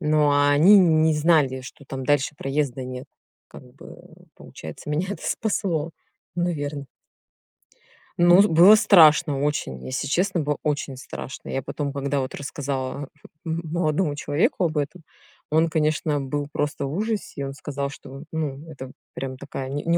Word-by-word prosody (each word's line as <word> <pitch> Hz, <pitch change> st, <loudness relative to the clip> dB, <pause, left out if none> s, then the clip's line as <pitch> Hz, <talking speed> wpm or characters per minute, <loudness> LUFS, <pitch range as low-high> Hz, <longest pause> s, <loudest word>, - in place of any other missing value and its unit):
Ну, 150 Hz, -1 st, +3 dB
а 145 Hz, 0 st, +3 dB
они 165 Hz, +9 st, +7 dB
н 160 Hz, -4 st, +4 dB
не 160 Hz, 0 st, +4 dB
знали, 150 Hz, -4 st, +2 dB
что 130 Hz, +3 st, -12 dB
там 135 Hz, -1 st, -6 dB
дальше 145 Hz, 0 st, +1 dB
проезда 135 Hz, -2 st, -2 dB
нет. 125 Hz, 0 st, -7 dB, 0.4 s
Как -, -, -12 dB
бы, -, -, -14 dB
э, -, -, -15 dB
получается 80 Hz, -, -10 dB
меня 160 Hz, +5 st, -1 dB
это -, -, -6 dB
спасло, 170 Hz, -7 st, -1 dB, 0.4 s
наверно. 150 Hz, -5 st, -2 dB, 1.3 s
Ну, 175 Hz, +2 st, +7 dB
с 205 Hz, -, +4 dB
было 180 Hz, +6 st, +8 dB
страшно 155 Hz, -8 st, +5 dB
очень, 105 Hz, -, -2 dB
если 130 Hz, +2 st, -3 dB
честно, 180 Hz, +4 st, +1 dB
было 150 Hz, -1 st, -1 dB
очень 145 Hz, -3 st, -2 dB
страшно. 130 Hz, +1 st, -8 dB
Я 135 Hz, -, -2 dB
потом, 140 Hz, +2 st, -4 dB
когда 140 Hz, 0 st, -1 dB
вот 130 Hz, -1 st, -4 dB
рассказала 140 Hz, -1 st, -4 dB, 0.4 s
м 165 Hz, +1 st, -2 dB
молодому 155 Hz, -1 st, 0 dB
человеку 150 Hz, +5 st, 0 dB
об 160 Hz, -2 st, -2 dB
этом, 150 Hz, +4 st, -3 dB, 0.5 s
он, 160 Hz, +2 st, +3 dB
конечно, 155 Hz, -1 st, 0 dB
был 145 Hz, +2 st, -3 dB
просто 145 Hz, -1 st, -2 dB
в 135 Hz, -, -4 dB
ужасе, 210 Hz, -6 st, -3 dB
и -, -, -1 dB
он 135 Hz, -, -5 dB
сказал, 140 Hz, 0 st, -4 dB
что, 135 Hz, -1 st, -11 dB
э, -, -, -9 dB
ну, 155 Hz, -1 st, -4 dB
это 130 Hz, -4 st, -9 dB, 0.2 s
прям 130 Hz, -1 st, -5 dB
такая 130 Hz, 0 st, -6 dB
не 145 Hz, +2 st, -3 dB
не 170 Hz, +1 st, +2 dB
145 Hz, 170 wpm, -24 LUFS, 140-160 Hz, 1.3 s, было